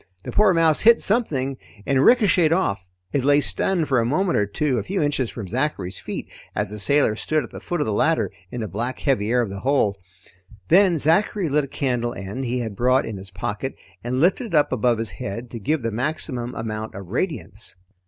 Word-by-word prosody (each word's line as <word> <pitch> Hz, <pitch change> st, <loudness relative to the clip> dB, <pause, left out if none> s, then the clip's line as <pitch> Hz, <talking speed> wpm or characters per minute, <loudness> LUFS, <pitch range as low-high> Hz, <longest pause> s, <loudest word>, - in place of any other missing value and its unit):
The -, -, -6 dB
poor 210 Hz, -2 st, +4 dB
mouse 165 Hz, -3 st, +3 dB
hit 230 Hz, +1 st, +6 dB
something 140 Hz, -, 0 dB, 0.3 s
and 135 Hz, -1 st, +2 dB
ricocheted 185 Hz, -9 st, +4 dB
off. 100 Hz, -, 0 dB, 0.3 s
It 140 Hz, -, +1 dB
lay 145 Hz, +1 st, +5 dB
stunned 165 Hz, +2 st, 0 dB
for 130 Hz, -3 st, +2 dB
a -, -, +2 dB
moment 170 Hz, +10 st, +1 dB
or 105 Hz, -, +2 dB
two 130 Hz, +4 st, 0 dB
a -, -, -4 dB
few 195 Hz, +1 st, -2 dB
inches 145 Hz, -6 st, 0 dB
from 110 Hz, -5 st, -7 dB
Zachary's 105 Hz, -6 st, -2 dB
feet -, -, -6 dB, 0.3 s
as 105 Hz, -1 st, -1 dB
the 105 Hz, -, -6 dB
sailor 140 Hz, 0 st, +3 dB
stood 155 Hz, +6 st, -1 dB
at 120 Hz, -, -10 dB
the -, -, -8 dB
foot 175 Hz, -3 st, -3 dB
of -, -, +1 dB
the 110 Hz, -, -1 dB
ladder 160 Hz, +10 st, +1 dB, 0.2 s
in 120 Hz, -, -5 dB
the 110 Hz, -, -3 dB
black 120 Hz, +6 st, -3 dB
heavy 110 Hz, -7 st, +1 dB
air 125 Hz, +1 st, +3 dB
of 105 Hz, -, -5 dB
the 100 Hz, -, -6 dB
hold. 110 Hz, -5 st, +1 dB, 0.7 s
Then 180 Hz, 0 st, +5 dB
Zachary 170 Hz, +4 st, +2 dB
lit 145 Hz, 0 st, +2 dB
a -, -, -11 dB
candle 125 Hz, -4 st, -2 dB
end 100 Hz, +8 st, -5 dB
he 125 Hz, +1 st, -1 dB
had 110 Hz, -4 st, -5 dB
brought 125 Hz, +4 st, +2 dB
in 110 Hz, -3 st, -5 dB
his 95 Hz, 0 st, -9 dB
pocket, 105 Hz, +8 st, -4 dB, 0.3 s
and 125 Hz, +2 st, -1 dB
lifted 190 Hz, -, +2 dB
it 170 Hz, -, -3 dB
up 150 Hz, -, +3 dB
above 120 Hz, -1 st, +2 dB
his 110 Hz, -2 st, -2 dB
head 105 Hz, +6 st, -6 dB
to 115 Hz, -, -6 dB
give 150 Hz, +5 st, -1 dB
the 115 Hz, -, -1 dB
maximum 125 Hz, 0 st, -3 dB
amount 110 Hz, -1 st, -5 dB
of 100 Hz, -1 st, -7 dB
radiance. 110 Hz, -, -4 dB
130 Hz, 220 wpm, -23 LUFS, 110-155 Hz, 0.7 s, hit